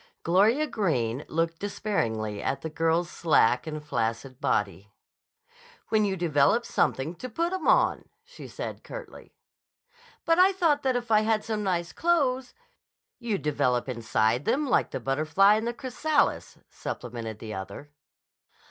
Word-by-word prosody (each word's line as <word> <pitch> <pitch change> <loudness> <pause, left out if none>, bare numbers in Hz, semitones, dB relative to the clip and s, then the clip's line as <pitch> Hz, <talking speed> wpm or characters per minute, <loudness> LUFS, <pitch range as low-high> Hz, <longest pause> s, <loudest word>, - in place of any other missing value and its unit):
Gloria 210 - +3
Greene 140 - -1
looked 165 +1 -1
disparagingly 110 - -2
at 135 - -2
the 160 - -5
girl's 165 +2 +1
slack 140 -7 +2
and 155 -1 -6
flaccid 120 0 -3
body. 100 0 -1 1.0
"When 215 -1 +3
you 195 -1 -1
develop 170 +6 +2
something 140 +6 0
to 255 - -7
put 335 +9 -1
'em 375 -4 -3
on," - - +3 0.2
said - - -7
she - - -29
curtly. - - -10 0.9
"But 330 +1 +3
I 380 +2 +6
thought 325 -6 +2
that 260 -2 +1
if 240 -2 -3
I 215 -1 +5
had 215 0 +1
some 220 -1 -3
nice 175 -4 -1
clothes—" 275 - 0 0.6
"You'd 225 -5 -3
develop 140 -5 0
inside 115 0 0
them 295 +2 +1
like 265 - +2
the - - -4
butterfly 155 +9 +3
in 220 +1 0
the 235 - 0
chrysalis," 285 +4 -1
supplemented 115 -3 -6
the 110 0 -7
other. 100 +9 -8
170 Hz, 145 wpm, -27 LUFS, -, 1.0 s, I